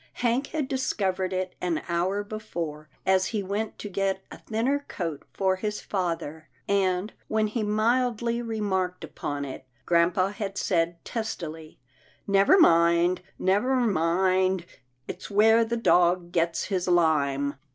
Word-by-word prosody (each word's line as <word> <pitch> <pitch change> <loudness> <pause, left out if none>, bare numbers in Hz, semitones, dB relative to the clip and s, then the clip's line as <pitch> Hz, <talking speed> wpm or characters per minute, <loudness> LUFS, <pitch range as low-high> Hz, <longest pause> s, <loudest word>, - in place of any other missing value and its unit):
Hank 245 +3 0
had 305 -3 -2
discovered 195 -8 -1
it 185 0 -2
an 175 -3 -1
hour 185 +4 0
before, 170 -8 -6 0.2
as 190 0 +3
he 210 -3 -2
went 205 +3 -3
to - - -6
get 195 0 -1
a - - -10
thinner 255 +6 -1
coat 165 -6 -4
for 190 -1 +1
his 210 +2 -3
father, 165 -5 -3 0.2
and, 195 0 +1
when 220 0 +1
he 215 +2 -2
mildly 235 +2 +1
remarked 190 -6 -2
upon 145 -2 -4
it, 130 -1 -8 0.2
grampa 175 +3 +3
had 200 -2 -5
said 170 -3 0
testily, 165 -9 -5 0.3
" - - -33
Never 200 - +5
mind 170 - +4
— - - -43
never 205 +8 +2
mind 185 -3 +2 0.2
— 125 0 -45
it's - - -7
where 220 +3 +5
the 235 +1 -2
dog 175 -5 +3
gets 165 -1 0
his 185 -3 -2
lime." 145 -5 +2
190 Hz, 145 wpm, -26 LUFS, 170-215 Hz, 0.3 s, Never